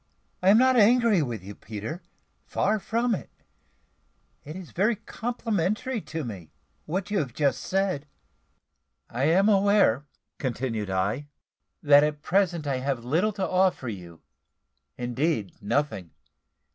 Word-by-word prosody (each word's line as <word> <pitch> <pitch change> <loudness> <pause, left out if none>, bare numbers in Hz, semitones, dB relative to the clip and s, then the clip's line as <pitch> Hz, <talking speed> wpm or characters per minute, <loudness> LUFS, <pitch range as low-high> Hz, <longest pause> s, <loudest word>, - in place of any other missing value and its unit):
I 185 - +4
am 205 - +7
not 260 +1 +5
angry 230 -3 +5
with 120 -9 -4
you, 100 +2 -8
Peter; 110 - -7 0.5
far 215 +2 +1
from 230 +4 0
it. 195 - -4 1.1
It 155 +3 -8
is 185 -3 -9
very 215 +6 +2
complimentary 225 +1 -2
to 155 0 -5
me 95 - -7 0.4
what 190 +5 -3
you 205 - +2
have 130 -6 -4
just 145 -3 +1
said." 185 -6 -1 1.0
"I 125 +4 0
am 185 +6 +4
aware," 200 - +3 0.3
continued 115 -5 -2
I, 100 +10 -1 0.6
"that 145 -1 +7
at 150 0 -2
present 180 -4 +1
I 140 -2 0
have 130 -2 -2
little 170 +12 +2
to 190 -2 -2
offer 185 -8 +1
you 90 -6 -9 0.7
indeed, 125 - -2
nothing. 100 - -1
155 Hz, 135 wpm, -26 LUFS, 125-200 Hz, 1.1 s, am